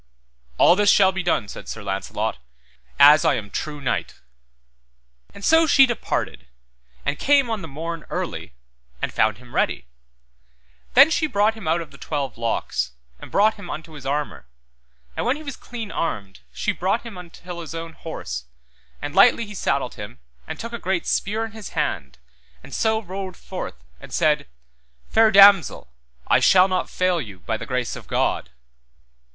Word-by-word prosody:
All 175 - +6
this 205 +1 +3
shall 190 -2 +6
be 190 0 -3
done, 175 - 0
said - - -9
Sir 110 - -6
Launcelot 95 -9 -3 0.6
as 145 +1 +8
I - - +3
am 100 -2 -6
true 150 +6 -4
knight. 135 - -3 1.1
And 200 - -8
so 320 +1 +5
she 275 -2 +7
departed, 70 - -3 0.6
and 145 - -1
came 275 -4 +3
on 220 -3 -2
the 165 - -7
morn 165 +2 -6
early, 60 - -4 0.4
and - - -3
found 110 -2 +2
him 125 0 -16
ready; - - 0 1.1
then 275 +5 +8
she 315 0 +1
brought 210 -3 +2
him 220 -6 -9
out 165 +2 +2
of 145 -4 -11
twelve 140 -4 -3
locks, 90 - -2 0.3
and - - -11
brought 215 +2 +4
him 205 - -10
unto 160 +1 -7
his 150 -3 -10
armour, 145 - -3 0.7
and - - -2
when 250 +3 +1
he 310 - -9
was 280 -3 -6
clean 230 -3 -7
armed, 100 -12 -3
she - - -1
brought 195 +6 -1
him 230 -4 -9
until 175 0 -9
his 165 0 -8
own 165 0 -6
horse, 60 - -6 0.6
and - - -4
lightly 230 - +5
he 210 - -10
saddled 140 - -1
him 105 -10 -9 0.3
and - - -6
took 230 +1 -6
a 235 - -4
great 185 -3 -1
spear 215 +3 0
in 225 - -9
his 220 -3 -9
hand 70 - -2 0.5
and - - -12
so 220 0 +1
rode 190 -1 -6
forth, - - -6 0.2
and - - -12
said, - - +2 0.6
Fair 225 0 +5
damosel, 195 - +6 0.3
I - - +5
shall 185 0 +6
not 185 -1 -1
fail 185 -2 +1
you, 100 -8 -10
by 110 - -2
the - - -7
grace 125 -2 -2
of - - -11
God. - - 0
170 Hz, 175 wpm, -23 LUFS, 130-215 Hz, 1.1 s, as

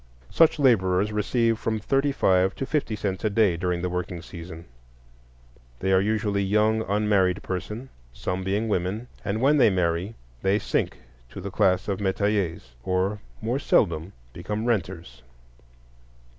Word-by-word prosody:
Such 165 -1 +4
laborers 105 -7 +3
receive 115 +2 +1
from 110 -2 -1
thirty 135 +6 +1
five 95 -7 +2
to 135 - -3
fifty 140 -7 -1
cents 95 -3 -3
a 110 - +2
day 100 -4 +3
during 90 0 -2
the - - +1
working 90 -1 -3
season. 85 0 -9 1.1
They 95 +5 0
are 95 - +5
usually 105 -1 0
young 105 +3 +2
unmarried 100 -2 +2
persons, 105 +7 -5 0.2
some 90 +9 -3
being 100 +4 -1
women; 105 +4 -2
and 105 +2 -2
when 145 +3 +4
they 130 - +6
marry 90 +2 -1 0.3
they 95 +1 +2
sink - - -1 0.3
to - - -9
the 100 +1 -6
class 95 -1 +2
of 100 -2 -1
metayers, 95 - -1
or, 95 +3 0 0.2
more 120 +5 0
seldom, 85 - +1 0.2
become 105 +2 -4
renters. 90 - -2
100 Hz, 145 wpm, -25 LUFS, 90-110 Hz, 1.1 s, they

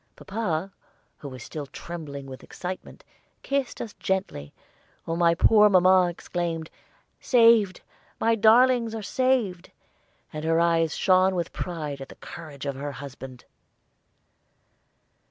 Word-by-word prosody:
Papa, 195 -3 -3 0.5
who 140 - -8
was 130 -2 -9
still 150 -3 -7
trembling 145 -3 -8
with 130 -1 -10
excitement, 185 0 -8 0.4
kissed 275 -2 -2
us 220 - -6
gently, 190 - -3 0.5
while 165 - -2
my 170 0 +3
poor 210 +4 +5
mamma 185 -1 +5
exclaimed, 170 -2 -4 0.5
"Saved! 230 -6 +4 0.4
my 230 +1 +2
darlings 230 +1 +4
are 220 - -5
saved!" 240 -7 0 0.6
and 155 0 -5
her 165 +1 +2
eyes 165 -2 +2
shone 185 0 +3
with 170 -2 -3
pride 150 -6 -5
at 135 - -8
the - - -12
courage 155 -5 -10
of 140 - -2
her 140 +2 -6
husband. 135 -2 -10
175 Hz, 125 wpm, -25 LUFS, 155-210 Hz, 0.6 s, poor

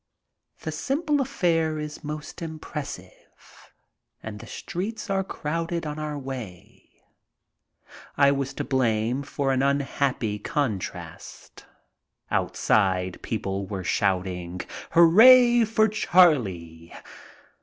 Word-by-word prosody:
The - - -4
simple 295 +1 0
affair 165 -9 0
is 150 +1 -6
most 150 +3 -7
impressive 150 - -9 0.5
and 105 -1 -7
the 115 - -11
streets 210 - -5
are 195 0 +1
crowded 165 -1 -3
on 150 0 -5
our 150 -1 -4
way. 125 -10 -9 1.3
I 140 0 +5
was 135 -1 -2
to - - -3
blame 120 -1 0
for 140 -1 -2
an 130 0 +1
unhappy 140 -5 0
con 140 -10 -1
trast. - - -10 0.6
Outside 95 -3 +1
people 100 -3 -3
were 95 -2 -5
shouting, 90 -2 -1
' - - -8
' - - -38
Hooray 240 +8 +7
for 220 0 +2
Charlie 115 - +2
140 Hz, 110 wpm, -25 LUFS, 105-170 Hz, 1.3 s, Hooray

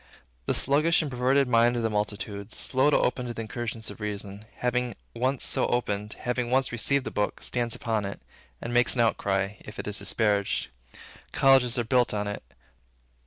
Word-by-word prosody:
The - - +1
sluggish 155 +5 +3
and 145 - -5
perverted 130 +2 +2
mind 120 0 +4
of 115 - -1
the 115 - +1
multitude, 105 0 -3
slow 130 +5 +2
to - - +4
open 125 0 0
to 120 - -5
the 115 - -4
incursions 115 -1 -5
of - - -12
Reason, 105 0 -5
having 125 -2 -1 0.2
once 130 +2 0
so - - +2
opened, 105 -3 -2
having 125 -1 -1
once 130 +1 +2
received 130 +4 +1
this - - -5
book, 105 0 -2
stands 120 -2 0
upon 110 -3 -2
it, 100 - -6 0.4
and 120 - -5
makes 120 +1 +4
an 120 - +2
outcry, 100 -2 0
if 105 - -11
it - - -6
is 105 0 0
disparaged. 105 -3 0 0.6
Colleges 130 -3 +4
are 120 - +1
built 120 -1 +2
on 105 0 -2
it. 105 - -4
120 Hz, 185 wpm, -27 LUFS, 105-125 Hz, 0.6 s, mind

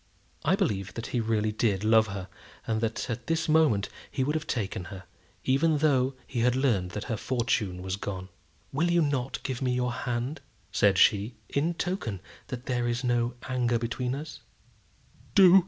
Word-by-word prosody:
I - - +4
believe 100 0 -1
that 115 - -4
he 125 - +2
really 110 -1 +1
did 105 -3 +1
love 110 0 +5
her, 100 -2 -5 0.4
and 110 -1 0
that 115 -1 -1
at 120 +1 -4
this 165 0 +1
moment 155 -11 +4 0.2
he 135 - -1
would 145 +3 0
have 155 0 -2
taken 95 -6 -2
her, 95 0 -8 0.4
even 150 +4 +3
though 135 -3 +2
he 125 - -4
had 125 +1 +3
learned 115 -9 +2
that 105 - -3
her 115 - -2
fortune 110 -6 -1
was 95 +1 -2
gone. 95 -2 -5 0.4
"Will 160 +6 +2
you 175 -1 +4
not 135 -3 -1
give 130 -2 -3
me 125 -1 +1
your 125 0 0
hand," 125 +4 -3 0.3
said 100 -2 +4
she, 105 +4 +4
"in 160 +5 0
token 170 - -2 0.3
that 125 0 -6
there 120 -1 0
is 120 +2 -1
no 120 0 +1
anger 125 -2 +1
between 125 +2 -2
us?" 150 +2 -7
120 Hz, 175 wpm, -28 LUFS, 110-135 Hz, 0.4 s, love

